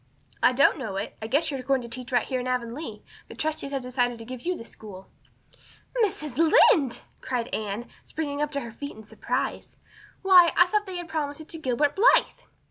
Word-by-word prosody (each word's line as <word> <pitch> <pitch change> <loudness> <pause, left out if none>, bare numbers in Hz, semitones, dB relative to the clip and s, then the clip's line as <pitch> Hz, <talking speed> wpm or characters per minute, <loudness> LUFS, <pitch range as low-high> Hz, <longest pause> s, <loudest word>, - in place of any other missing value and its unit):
"I - - +6
don't 280 +4 +4
know 220 -7 -4
it. 195 +2 -4
I 220 - -4
guess 300 +6 +1
you're 270 -2 -3
going 270 -1 0
to - - -7
teach 245 +2 -7
right 245 -2 +2
here 255 - -2
in 250 - -4
Avonlea. 250 +4 -4 0.2
The - - -11
trustees 310 -2 -2
have 270 -2 -2
decided 245 -1 0
to 225 - -10
give 250 0 -7
you 360 -1 0
the 230 - -9
school." 195 -5 -11 1.0
"Mrs. 305 - -2
Lynde!" 310 -4 +5 0.2
cried 245 -2 -3
Anne, 215 +2 -3 0.2
springing 290 -2 -4
to 285 -1 -3
her 235 - -7
feet 285 +6 -7
in 220 - -12
her - - -22
surprise. - - -3 0.5
"Why, 360 -3 +7
I 355 - +8
thought 415 +3 0
they 370 -1 -5
had 350 -1 -5
promised 300 -2 -3
it 315 - -13
to 325 - -4
Gilbert 285 +1 +1
Blythe!" 460 +6 +3
270 Hz, 210 wpm, -26 LUFS, 240-315 Hz, 1.0 s, I